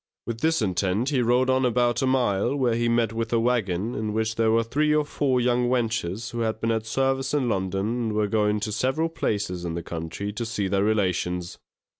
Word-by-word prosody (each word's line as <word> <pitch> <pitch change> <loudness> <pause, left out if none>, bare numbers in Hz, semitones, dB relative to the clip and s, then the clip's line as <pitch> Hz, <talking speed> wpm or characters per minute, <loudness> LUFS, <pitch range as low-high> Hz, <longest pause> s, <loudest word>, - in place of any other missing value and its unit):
With 115 -1 -4
this 160 -2 +1
intent 100 +5 0
he 135 -4 +1
rode 125 +2 +3
on 130 0 +2
about 120 0 +2
a 135 - +1
mile, 120 -2 +1
when 125 -4 +1
he 120 0 +1
met 115 -2 +1
with 115 0 -3
a 115 - +3
waggon, 115 -3 0
in 105 -1 -3
which 110 0 -1
were 115 0 +3
three 150 +6 +1
or 150 -1 +2
four 135 -3 0
young 125 0 +2
wenches, 115 -4 -1
who 120 - -4
had 110 -1 -1
been 115 0 0
at 110 -1 -2
service 135 +4 0
in 135 -4 +1
London 95 -2 -1
and 115 -1 -1
were 105 0 +1
going 105 0 +1
to 105 +1 -2
several 130 +9 0
places 100 - -2
in 85 -1 -3
the 85 - -4
country 85 +5 -5
to 120 - -3
see 110 -4 -2
their 100 +1 +1
relations. 90 -4 -1
115 Hz, 215 wpm, -25 LUFS, 105-125 Hz, -, rode